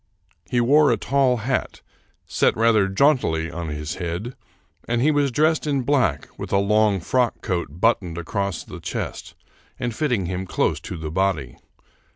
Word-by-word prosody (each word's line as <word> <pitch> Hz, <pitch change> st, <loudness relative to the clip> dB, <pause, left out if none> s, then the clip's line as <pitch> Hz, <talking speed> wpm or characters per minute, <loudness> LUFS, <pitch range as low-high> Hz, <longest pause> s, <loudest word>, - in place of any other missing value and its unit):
He 120 Hz, -, +1 dB
wore 145 Hz, +5 st, +5 dB
a -, -, +2 dB
tall 135 Hz, -2 st, +2 dB
hat, 130 Hz, 0 st, -2 dB, 0.4 s
set -, -, +1 dB
rather 110 Hz, -3 st, +4 dB
jauntily 95 Hz, -, +2 dB
on 85 Hz, 0 st, -5 dB
his 75 Hz, +3 st, -5 dB
head, 90 Hz, +8 st, -4 dB, 0.5 s
and 120 Hz, 0 st, 0 dB
he 145 Hz, +6 st, +3 dB
was 145 Hz, -2 st, +2 dB
dressed 155 Hz, +4 st, +2 dB
in 140 Hz, -3 st, 0 dB
black 125 Hz, -, +1 dB
with -, -, -6 dB
a 100 Hz, -, +3 dB
long 105 Hz, 0 st, +3 dB
frock 125 Hz, +7 st, 0 dB
coat 90 Hz, -5 st, -1 dB
but 115 Hz, +11 st, +2 dB
toned 85 Hz, -3 st, -7 dB
across 100 Hz, +2 st, -3 dB
the -, -, -10 dB
chest -, -, -5 dB, 0.4 s
and 120 Hz, -1 st, -2 dB
fitting 120 Hz, -, 0 dB
him 95 Hz, +1 st, -4 dB
close -, -, 0 dB
to -, -, -7 dB
the 80 Hz, -1 st, -5 dB
body. 85 Hz, -8 st, -1 dB
105 Hz, 170 wpm, -23 LUFS, 85-130 Hz, 0.5 s, wore